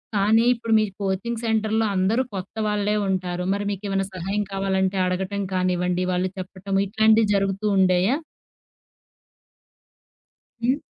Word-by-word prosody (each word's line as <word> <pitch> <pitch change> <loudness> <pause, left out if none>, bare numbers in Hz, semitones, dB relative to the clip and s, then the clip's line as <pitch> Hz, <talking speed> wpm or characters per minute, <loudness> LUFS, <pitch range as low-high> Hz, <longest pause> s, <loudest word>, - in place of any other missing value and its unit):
కానీ, 215 +3 +4
ఇప్పుడు 230 -1 -2
మీరు 215 -2 0
కోచింగ్ 220 +5 -2
సెంటర్‌లో 220 0 +1
అందరూ 195 +6 +2
కొత్తవాళ్ళే 210 +2 -1
ఉంటారు. 180 -2 -2
మరి 200 +1 -2
మీకే‌మన్నా 195 -1 -2
సహాయం 195 +4 -2
కావాలంటే, 190 0 0
అడగటం 190 +2 -2
కానివ్వండి, 180 0 0
వాళ్ళు 180 +1 0
చెప్పటము, 195 +1 -3
ఇట్లాంటియి 220 +1 +4
జరుగుతూ 195 +1 -1
ఉండేయా? 190 +6 +3 2.5
హ్మ్. 255 +4 +2
195 Hz, 110 wpm, -23 LUFS, 185-215 Hz, 2.5 s, కానీ